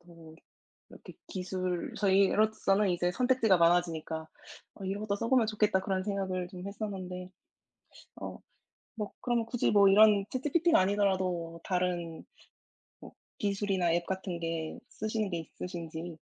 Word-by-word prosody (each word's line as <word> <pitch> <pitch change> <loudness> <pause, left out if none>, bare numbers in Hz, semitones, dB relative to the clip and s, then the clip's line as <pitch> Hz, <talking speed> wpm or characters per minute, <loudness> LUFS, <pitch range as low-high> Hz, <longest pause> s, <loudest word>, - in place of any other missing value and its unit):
더 165 -2 -15 0.6
이렇게 - - -13
기술 185 -1 -3
저희로서는 200 0 +3
이제 175 0 +1
선택지가 245 -5 +3
많아지니까 165 -2 +1 0.5
'어 195 - -8
이런 200 +2 -3
것도 205 -2 -1
써 230 - -2
보면 250 -4 +4
좋겠다.' 210 -3 +2
그런 190 -1 -1
생각을 190 -3 -2
좀 185 -1 -9
했었는데. 185 -3 -5 0.9
어. - - -6 0.6
뭐 210 -2 -4
그러면 240 -2 0
굳이 235 -1 0
뭐 200 -1 +7
이런 205 0 +6
ChatGPT가 305 +6 +2
아니더라도 185 -4 0
다른 180 -3 -2 0.8
뭐 - - -12 0.3
기술이나 195 -4 +1
앱 170 0 0
같은 190 -2 -4
게 165 -1 -3
쓰시는 215 -1 -2
게 170 - -2
있으신지. 165 0 -7
190 Hz, 315 characters per minute, -30 LUFS, 175-210 Hz, 0.9 s, 뭐